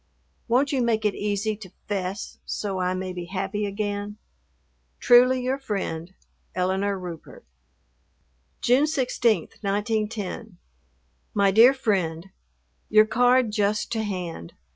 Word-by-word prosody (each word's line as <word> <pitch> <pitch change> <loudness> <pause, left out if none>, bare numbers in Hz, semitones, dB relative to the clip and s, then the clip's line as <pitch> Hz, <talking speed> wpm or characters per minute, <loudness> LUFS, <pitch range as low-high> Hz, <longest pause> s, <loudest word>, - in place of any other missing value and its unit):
Won't 255 +4 +2
you 270 -3 +1
make 225 -2 +1
it 210 - +2
easy 210 +1 -1
to 200 -3 -11 0.2
"'fess" 195 0 -4
so 195 -3 -3
I 180 0 0
may 185 0 -4
be 175 -1 -6
happy 195 +3 -3
again? 205 0 -3 0.8
Truly 250 +1 +5
your 260 +2 -1
friend, 185 -8 -4 0.4
ELINORE 190 +2 0
RUPERT. 175 -3 -9 1.2
June 260 +5 +4
16, 245 - +1
1910. 210 -1 -2 0.8
MY 200 -1 +4
DEAR 235 +7 +7
FRIEND, 190 -7 -1 0.6
Your 215 0 +6
card 245 +1 +3
just 210 0 0
to 225 - 0
hand. 180 - -5
205 Hz, 120 wpm, -25 LUFS, 190-230 Hz, 1.2 s, DEAR